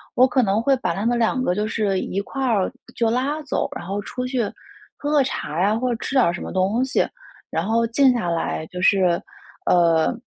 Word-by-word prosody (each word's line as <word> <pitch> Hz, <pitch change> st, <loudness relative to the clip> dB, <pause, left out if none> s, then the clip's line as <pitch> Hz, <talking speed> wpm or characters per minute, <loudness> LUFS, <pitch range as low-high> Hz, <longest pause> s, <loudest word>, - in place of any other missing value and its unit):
我 255 Hz, -, +6 dB
可 255 Hz, -1 st, +2 dB
能 205 Hz, +2 st, +1 dB
会 275 Hz, +2 st, +3 dB
把 205 Hz, -9 st, -1 dB
她 200 Hz, +5 st, -3 dB
们 240 Hz, 0 st, +2 dB
两 235 Hz, +3 st, +1 dB
个 180 Hz, -7 st, +1 dB
就 210 Hz, -, 0 dB
是 210 Hz, -3 st, 0 dB
一 195 Hz, -, -3 dB
块 270 Hz, +6 st, -4 dB
儿 215 Hz, -7 st, +2 dB, 0.2 s
就 230 Hz, -1 st, +1 dB
拉 270 Hz, +6 st, -1 dB
走， 280 Hz, -, -1 dB
然 -, -, -7 dB
后 200 Hz, +1 st, -2 dB
出 250 Hz, +5 st, -5 dB
去 250 Hz, -1 st, 0 dB, 0.6 s
喝 290 Hz, -, -3 dB
个 290 Hz, -3 st, +4 dB
茶 160 Hz, -, -3 dB
呀， 205 Hz, +3 st, +3 dB
或 250 Hz, +2 st, -1 dB
者 240 Hz, -, 0 dB
吃 -, -, -4 dB
点 260 Hz, -3 st, +5 dB
儿 170 Hz, -, +1 dB
什 180 Hz, -, -6 dB
么 -, -, -6 dB
东 195 Hz, +6 st, +1 dB
西， 265 Hz, -, +1 dB, 0.4 s
然 -, -, -1 dB
后 230 Hz, +2 st, +2 dB
静 260 Hz, +3 st, +4 dB
下 220 Hz, -8 st, -1 dB
来 165 Hz, -1 st, -2 dB
就 180 Hz, -1 st, -7 dB
是 185 Hz, -3 st, +3 dB, 0.5 s
呃， 170 Hz, +1 st, +4 dB
225 Hz, 245 characters per minute, -22 LUFS, 190-255 Hz, 0.6 s, 我